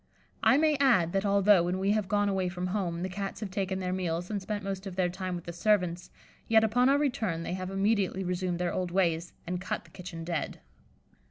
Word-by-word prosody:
I 270 - +5
may 305 -1 +3
add, 235 -12 +3
that 195 +1 +1
although, 200 -1 +5
when 175 +2 -1
we 195 +2 +1
have 210 -2 +1
gone 205 0 +2
away 190 -2 0
from 180 0 -4
home, 180 -3 -2
the - - -1
Cats 195 +1 -5
have 205 -3 -4
taken 190 -1 -1
their 185 -1 -2
meals 175 0 -2
and 205 -2 -2
spent 205 +1 -4
most 195 0 -4
of 185 - -7
their 180 -1 +1
time 185 0 -4
with 175 - -6
the 170 - -7
servants, 180 -2 +1 0.4
yet 225 0 +5
upon 245 +4 +3
our 280 - +5
return 220 - -1
they 170 - -3
have 185 0 -4
immediately 195 -1 +1
resumed 180 -1 -1
their 175 0 -1
old 180 -1 -1
ways, 170 -2 0
and 180 +1 -3
cut 185 - -3
the - - -20
kitchen 180 -3 -8
dead. 165 -2 -3
190 Hz, 230 wpm, -29 LUFS, 180-205 Hz, 0.4 s, I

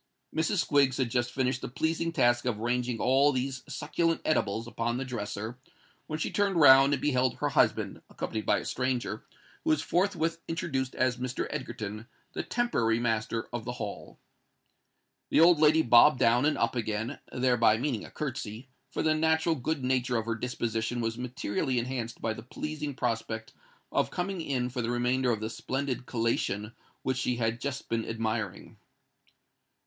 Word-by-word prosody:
Mrs. 160 +6 +1
Squiggs 140 -3 +3
had 125 -3 0
just 125 0 0
finished 130 -1 0
the - - -4
pleasing 160 +6 -1
task 120 -5 +2
of 120 -4 0
ranging 120 +1 -1
all 135 +3 +4
these 130 0 -2
succulent 165 +2 0
edibles 115 -7 +1
upon 120 0 -2
the 135 - -3
dresser, 110 0 -5 0.5
when 155 - -3
she 155 - -2
turned 200 -2 +1
round 135 -1 +8
and 140 - +1
beheld 130 -4 +2
her - - -1
husband, - - +1
accompanied 110 -1 -4
by - - +3
a - - -5
stranger, 125 -5 -2 0.4
who 320 - -1
was 310 - +2
forthwith 165 -3 0
introduced 135 -6 -2
as 130 -1 +1
Mr. 125 0 -3
Egerton, 105 +2 -5 0.3
the - - -2
temporary 120 - +1
master 115 -1 -1
of 120 -2 -3
the 120 +1 -4
Hall. 105 -4 -7 1.1
The - - +3
old 170 -1 +7
lady 155 +1 +5
bobbed 120 +4 +7
down 120 +2 +4
and 155 - +1
up 115 +2 0
again—thereby 115 +1 +1
meaning 125 -3 -2
a - - -9
curtsey; 130 -4 -5 0.2
for - - -2
the 155 - +3
natural 160 +1 +2
good 155 0 -2
nature 125 -1 +1
of 110 - -2
her 115 - -1
disposition 115 0 -2
was 115 0 -2
materially 125 0 -2
enhanced 120 -1 -3
by 110 - 0
the - - -8
pleasing 150 +3 -5
prospect 115 -2 -3 0.4
of - - +1
coming 180 0 -3
in 130 -5 -1
for 125 0 -2
the 115 - -2
remainder 125 +1 +1
of 110 -3 0
the 110 - -2
splendid 130 -1 -3
collation 115 -2 -1 0.3
which 130 -1 0
she 125 -1 0
had 115 0 -1
just 140 -1 -4
been 115 -1 -2
admiring. 110 -3 -3
125 Hz, 170 wpm, -29 LUFS, 115-140 Hz, 1.1 s, round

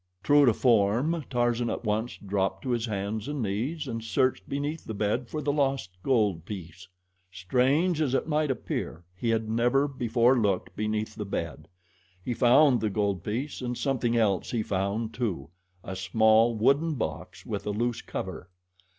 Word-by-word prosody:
True 145 -1 +5
to 120 - +6
form, 125 +8 +2
Tarzan 120 -1 +1
at - - -3
once 110 +3 -1
dropped 95 -1 -2
to 130 - -2
his 120 -1 0
hands 105 +2 -3
and 145 -4 -2
knees 130 +10 -2
and 115 -2 -4
searched 125 +4 0
beneath 145 +3 -3
the 110 - -6
bed 110 +5 -1
for 155 -1 -4
the 145 - +1
lost 135 -9 0
gold 105 - +1
piece. 90 -2 -8 0.4
Strange 135 - +1
as 135 -4 +1
it - - 0
might 155 -1 +1
appear, 110 -8 -3
he 115 +6 -2
had 110 -1 +1
never 120 +5 +2
before 120 -2 +2
looked 105 -6 0
beneath 110 0 -2
the 110 - -5
bed. 85 -6 -5 0.6
He 125 - -1
found 125 +2 +5
the 110 - +1
gold 100 -3 -1
piece, 130 +9 -3
and 125 -1 -3
something 120 -4 0
else 100 -6 +1
he 115 -3 -1
found, 100 +4 -2
too 90 - -3 0.3
a 95 - -6
small 110 +4 +3
wooden 140 +8 +2
box 120 - -5
with 100 -2 -4
a - - 0
loose 120 +3 -1
cover. 85 - -6
115 Hz, 170 wpm, -27 LUFS, 105-130 Hz, 0.6 s, to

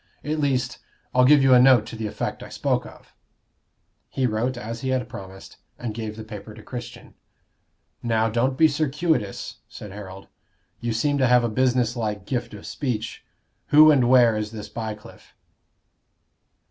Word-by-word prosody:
"At 155 +1 -2
least, 130 -4 0 0.3
I'll 125 0 +5
give 145 +1 +6
you 135 -1 +6
a 125 - +7
note 125 -4 +6
to - - -8
the 110 -1 -4
effect - - -4
I - - -9
spoke - - -1
of." - - -16 1.0
He 130 - -1
wrote 120 +2 -1
as 115 0 -6
he 130 - -2
had 130 -3 0
promised, 95 -5 -11 0.2
and 120 -3 -5
gave 110 -1 -5
the 110 - -8
paper 110 0 -9
to 110 - -13
Christian. 120 +1 -9 0.9
"Now, 115 -1 +1
don't 120 +4 0
be 160 - +6
circuitous," 150 - -1
said 105 - -10
Harold. 95 -1 -10 0.5
"You 120 - -2
seem 145 +6 0
to 130 - +4
have 125 0 +5
a 120 - 0
business 125 0 +1
like 105 -4 -3
gift 120 -2 -3
of 100 - -11
speech. 115 -6 -4 0.4
Who 155 +1 +8
and 130 -5 +3
where 120 -3 +6
is 105 0 -2
this 110 -1 -8
Bycliffe?" 110 -2 -8
120 Hz, 170 wpm, -24 LUFS, 110-130 Hz, 1.0 s, Who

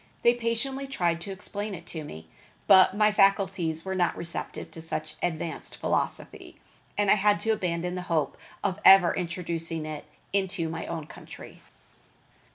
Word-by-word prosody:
They 235 - +6
patiently 245 +4 -2
tried 170 -10 0
to 195 - -6
explain 205 +1 -4
it 170 -1 -11
to 160 -2 -4
me, 80 - -10 0.4
but 190 -1 +7
my 210 0 +5
faculties 190 -5 +2
were 190 - -2
not 180 -2 +1
receptive 170 0 -6
to 165 - -8
such 160 - -4
advanced 165 -1 -3
philosophy, - - -3 0.4
and 205 -1 +3
I - - +9
had 205 0 +3
to 225 - +1
abandon 180 -4 -1
the 180 - -3
hope 155 -5 +1 0.3
of 190 -3 -1
ever 190 -3 +8
introducing 165 -2 -3
it 155 -1 -6 0.3
into 190 -4 0
my 165 - -5
own 165 -3 -4
country. - - -12
180 Hz, 160 wpm, -27 LUFS, 165-200 Hz, 0.4 s, I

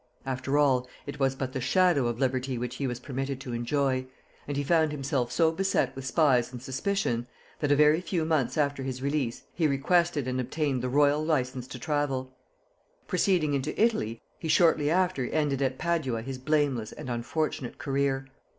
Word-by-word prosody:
After 135 +2 -1
all, 130 -4 +3 0.2
it 140 - -7
was 135 -1 +2
but 130 -1 -4
the 130 - -2
shadow 145 0 +3
of 120 -1 -2
liberty 130 -1 0
which 125 +1 -4
he 140 - -1
was 120 -1 -4
permitted 135 0 -4
to 130 -4 -6
enjoy; 130 +2 0 0.4
and 145 -1 -3
he 145 - 0
found 160 0 +3
himself 135 -4 -1
so 160 +5 +3
beset 190 +3 0
with 135 -1 -6
spies 130 -6 +3
and 125 - -7
suspicion, 130 -2 -1 0.3
that 145 -2 0
a - - +6
very 150 +3 +5
few 170 -2 -1
months 155 -3 0
after 140 -2 +1
his 130 -1 -4
release 140 -4 -1
he 165 -3 +2
requested 150 +1 +1
and 130 0 -1
obtained 135 0 -1
the 125 - -2
royal 145 +2 +3
license 130 -5 -1
to 130 - -7
travel. 135 -1 -1 0.8
Proceeding 180 -5 +2
into 135 -2 -2
Italy, 165 - +1 0.2
he 165 - -4
shortly 160 -2 +4
after 180 -5 +1
ended 145 -2 0
at 130 -1 0
Padua 155 -9 -1
his 130 +1 -6
blameless 140 -5 0
and - - -8
unfortunate 125 +2 -2
career. 135 -1 0
140 Hz, 180 wpm, -28 LUFS, 130-155 Hz, 0.8 s, a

